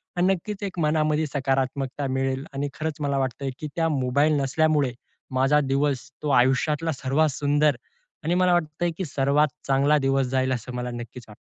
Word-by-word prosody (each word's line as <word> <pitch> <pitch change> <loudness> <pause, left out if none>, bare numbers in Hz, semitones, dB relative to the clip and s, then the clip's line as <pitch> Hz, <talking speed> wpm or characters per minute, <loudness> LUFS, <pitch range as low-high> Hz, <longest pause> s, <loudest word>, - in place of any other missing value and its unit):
आणि 175 0 +2
नक्कीच 205 +3 -6
एक 190 -3 -4
मनामध्ये 155 0 +1
सकारात्मकता 135 0 -1
मिळेल. 135 0 -1
आणि 140 +1 -2
खरंच 155 -1 -3
मला 140 -1 0
वाटतंय, 135 +1 -2
की 155 - -4
त्या 165 -1 +1
मोबाईल 140 +1 +2
नसल्यामुळे 145 -1 +1 0.5
माझा 140 +3 +4
दिवस 135 -1 0
तो 150 - -1
आयुष्यातला 150 +6 +1
सर्वात 140 +3 +1
सुंदर 145 +1 +2 0.5
आणि 170 +3 +1
मला 180 -1 +3
वाटतंय, 170 0 0
की 190 - -2
सर्वात 140 +1 +2 0.2
चांगला 140 +2 +3
दिवस 135 -1 +1
जाईल 130 +1 0
असं 125 +1 -5
मला 125 0 -3
नक्कीच 120 +1 -8
वाटतं. 105 - -13
140 Hz, 165 wpm, -25 LUFS, 135-155 Hz, 0.5 s, माझा